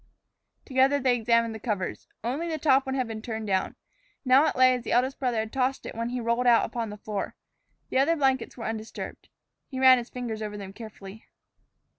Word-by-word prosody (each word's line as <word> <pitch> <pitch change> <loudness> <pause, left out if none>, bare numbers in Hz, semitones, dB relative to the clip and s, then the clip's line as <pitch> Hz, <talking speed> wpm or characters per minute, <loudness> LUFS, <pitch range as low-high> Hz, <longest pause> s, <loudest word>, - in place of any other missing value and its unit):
Together 270 +1 +3
they 255 -2 +3
examined 230 -1 +2
the 220 - -7
covers. 205 -5 -3 0.2
Only 275 +9 -2
the 320 - -2
top 275 -3 +3
one 265 - -1
had 255 -3 0
been 220 -1 -6
turned 220 -1 -5
down. 190 -2 0 0.5
Now 265 +4 +6
it - - -1
lay 255 0 +6
as 250 - -2
the - - -4
eldest 260 +3 +1
brother 250 -4 0
had 220 0 -7
tossed 265 0 0
it - - -6
when 230 +1 -3
he 250 +1 -3
rolled 235 +1 0
out 235 -1 +5
upon 230 -1 -4
the 210 - -8
floor. 210 -1 -4 0.6
The 260 - +2
other 310 +5 +3
blankets 265 -5 0
were 230 - -6
undisturbed. 220 0 -6 0.4
He 260 - -6
ran 260 -1 +7
his 240 - -8
fingers 235 -3 -5
over 210 -1 -4
them 195 -1 -8
carefully. 215 -1 -11
240 Hz, 210 wpm, -27 LUFS, 220-260 Hz, 0.6 s, ran